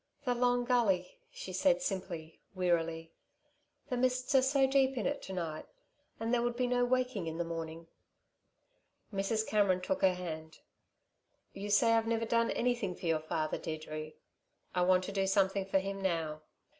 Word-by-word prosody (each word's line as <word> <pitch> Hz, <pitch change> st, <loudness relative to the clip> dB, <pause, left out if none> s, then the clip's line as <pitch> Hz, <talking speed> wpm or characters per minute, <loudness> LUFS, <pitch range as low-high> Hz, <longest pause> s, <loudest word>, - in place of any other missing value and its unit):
"The 250 Hz, -, +2 dB
Long 245 Hz, 0 st, +2 dB
Gully," 210 Hz, -8 st, +1 dB
she 185 Hz, -, -8 dB
said 265 Hz, +8 st, +3 dB
simply, 175 Hz, -7 st, -4 dB, 0.2 s
wearily, 165 Hz, -3 st, 0 dB, 0.8 s
"the 250 Hz, -, -1 dB
mists 255 Hz, +2 st, +1 dB
are 265 Hz, -, +6 dB
so 270 Hz, +1 st, +3 dB
deep 270 Hz, 0 st, +2 dB
in -, -, -1 dB
it 285 Hz, -, -1 dB
to 190 Hz, -, -7 dB
night, 165 Hz, -4 st, -4 dB, 0.5 s
and 225 Hz, +2 st, -1 dB
there 240 Hz, -, +3 dB
would 240 Hz, 0 st, -1 dB
be 250 Hz, +1 st, +1 dB
no 245 Hz, 0 st, +2 dB
waking 250 Hz, -7 st, 0 dB
in 160 Hz, 0 st, -4 dB
the 170 Hz, -, 0 dB
morning." 165 Hz, 0 st, -5 dB, 1.3 s
Mrs. 210 Hz, +3 st, 0 dB
Cameron 200 Hz, -4 st, +2 dB
took 280 Hz, +10 st, -2 dB
her 190 Hz, -2 st, +4 dB
hand. 160 Hz, -3 st, -6 dB, 1.0 s
"You 200 Hz, +1 st, -6 dB
say 230 Hz, +3 st, +5 dB
I've 225 Hz, 0 st, +2 dB
never 230 Hz, 0 st, 0 dB
done 230 Hz, 0 st, +2 dB
anything 235 Hz, -6 st, 0 dB
for -, -, -9 dB
your 165 Hz, -2 st, +2 dB
father, 155 Hz, 0 st, -2 dB
Deirdre. 155 Hz, -1 st, -5 dB, 0.6 s
I 180 Hz, -, +1 dB
want 185 Hz, +1 st, +4 dB
to 190 Hz, -, -5 dB
do 195 Hz, -1 st, 0 dB
something 195 Hz, 0 st, +2 dB
for 195 Hz, -, +2 dB
him 195 Hz, +1 st, -3 dB
now. 165 Hz, -5 st, -1 dB
195 Hz, 170 wpm, -33 LUFS, 170-245 Hz, 1.3 s, are